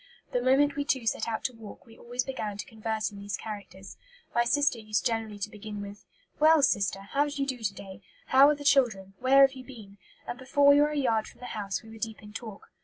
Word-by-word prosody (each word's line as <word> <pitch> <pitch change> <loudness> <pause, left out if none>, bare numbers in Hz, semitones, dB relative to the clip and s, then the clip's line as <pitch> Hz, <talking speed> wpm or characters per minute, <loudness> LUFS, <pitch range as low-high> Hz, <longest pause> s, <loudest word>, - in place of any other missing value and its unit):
The 245 - 0
moment 275 +3 +3
we 285 - -1
two 265 -5 -1
set 225 - 0
out 225 -1 -3
to 255 - -2
walk, 225 -3 -12
we 225 - -16
always 245 +1 -3
began 215 -7 -5
to - - -5
converse 220 -2 -3
in 200 - -10
these 200 -1 -4
characters. 200 -3 -9 0.4
My 235 0 +2
sister 285 -1 +2
used 215 -3 -2
generally 225 -2 -1
to 205 +1 -4
begin 210 0 -8
with, 200 0 -9 0.3
'Well, 310 -1 +6
sister, 200 -7 +1
how 280 +9 0
do 285 - -7
you 275 - +1
do 260 -2 -4
to 210 -3 -2
day? 190 -1 -10 0.2
How 270 +2 +6
are 300 - +2
the 290 - -9
children? 235 -9 +2
Where 265 +2 +5
have 270 - -2
you 260 -1 -10
been?' 215 -6 -13 0.3
and 245 - -5
before 270 +2 +1
we 285 +1 +7
were 295 - +3
a 300 - -4
yard 230 -6 +1
from - - -16
the 250 - -9
house 200 -2 -3
we 220 - -13
were 225 - -11
deep 220 0 -5
in 210 0 -12
talk. 220 -3 -9
225 Hz, 250 wpm, -28 LUFS, 210-270 Hz, 0.4 s, we